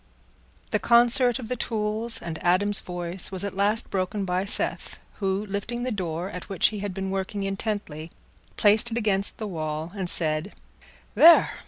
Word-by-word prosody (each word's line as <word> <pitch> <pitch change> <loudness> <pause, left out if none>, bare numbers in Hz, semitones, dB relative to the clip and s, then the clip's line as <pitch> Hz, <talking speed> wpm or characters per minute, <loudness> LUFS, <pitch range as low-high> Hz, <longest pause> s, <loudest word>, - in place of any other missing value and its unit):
The - - +1
concert 240 +1 +4
of 250 -4 -8
the 250 - -3
tools 220 0 -2
and 165 -2 -7
Adam's 195 +3 +3
voice 175 +1 -1
was 190 -1 +3
at 200 - -4
last 205 +4 +1
broken 195 +1 -2
by 180 +1 -1
Seth, 200 - -2 0.2
who, 195 0 -1
lifting 210 +4 -5
the 255 - -2
door 180 -2 -4
at 180 - -9
which 195 -3 +3
he 210 - -7
had 200 0 -4
been 190 -1 -4
working 195 +1 -3
intently, 195 -6 -4 0.5
placed 215 +3 +4
it 230 - -4
against 205 -3 +1
the 220 - -5
wall, 160 -3 -5
and 190 -3 -3
said, 155 +3 -1 0.6
"There! 335 +1 +7
200 Hz, 170 wpm, -25 LUFS, 180-215 Hz, 0.6 s, There